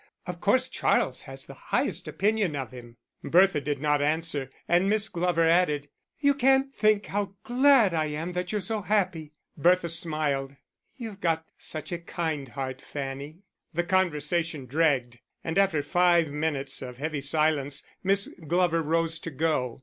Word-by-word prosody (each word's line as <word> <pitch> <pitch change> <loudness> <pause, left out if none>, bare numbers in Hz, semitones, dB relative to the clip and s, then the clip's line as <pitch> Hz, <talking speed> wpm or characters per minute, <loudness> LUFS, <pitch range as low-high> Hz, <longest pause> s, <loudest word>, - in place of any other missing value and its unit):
Of 175 -1 -6
course 230 +6 +3
Charles - - +1
has - - -9
the - - -10
highest - - -2
opinion 205 -5 0
of 135 -2 -4
him." 120 -2 -12 0.3
Bertha 180 -3 +4
did 145 -1 -2
not 150 0 +1
answer, 150 -2 -1 0.2
and 180 +3 +3
Miss 215 0 +1
Glover 170 -2 +1
added, 150 -4 +2 0.3
"You 285 -1 +4
can't 270 0 +3
think 215 -3 +2
how 200 -1 -3
glad 260 -5 +4
I 160 -1 +1
am 155 +3 -4
that 180 0 -3
you're 210 -1 -1
so 215 +3 -2
happy." 180 -7 -1 0.2
Bertha 175 +3 +3
smiled. 155 -4 -2 0.4
"You've 220 -5 -8
got 160 -1 0
such 155 +1 -3
a 175 - -2
kind 160 -5 -3
heart, 130 0 -5
Fanny." 140 +5 -6 0.3
The 175 - +1
conversation 170 -4 0
dragged, 130 -4 +1 0.2
and 165 +3 0
after 180 -7 +2
five 175 0 +3
minutes 145 -2 -2
of 125 -2 -7
heavy 150 +1 -3
silence 145 -1 +1 0.2
Miss 195 +1 +2 0.2
Glover 175 0 +2
rose 165 +1 +1
to 165 - -6
go. 140 -5 -1
165 Hz, 155 wpm, -27 LUFS, 145-185 Hz, 0.4 s, Bertha